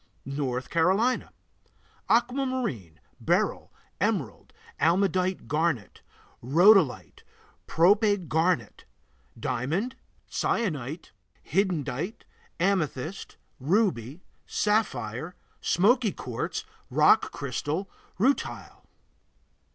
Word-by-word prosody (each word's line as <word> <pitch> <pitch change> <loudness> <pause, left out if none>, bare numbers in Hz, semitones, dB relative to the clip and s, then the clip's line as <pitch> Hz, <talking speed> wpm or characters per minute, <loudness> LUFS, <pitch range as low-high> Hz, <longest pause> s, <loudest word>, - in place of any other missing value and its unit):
North 135 -2 -3
Carolina 190 +10 +2 0.8
Aquamarine, 240 - 0 0.2
beryl, - - 0 0.3
emerald, - - -2 0.3
almandite 185 +3 +1
garnet, 150 -7 -1 0.4
rhodolite, 150 - +4 0.5
prope 200 +2 +3
garnet, 160 - 0 0.5
diamond, 170 - -2 0.3
cyanite, 155 - -2 0.4
hiddenite, 175 - -1 0.4
amethyst, 175 -2 -1 0.2
ruby, 160 - 0 0.2
sapphire, 160 - -1 0.3
smoky 220 +4 +3
quartz, 125 -8 -4 0.2
rock - - +4
crystal, 145 +7 -3 0.3
rutile. 265 +7 -1
170 Hz, 65 wpm, -27 LUFS, 135-205 Hz, 0.8 s, rhodolite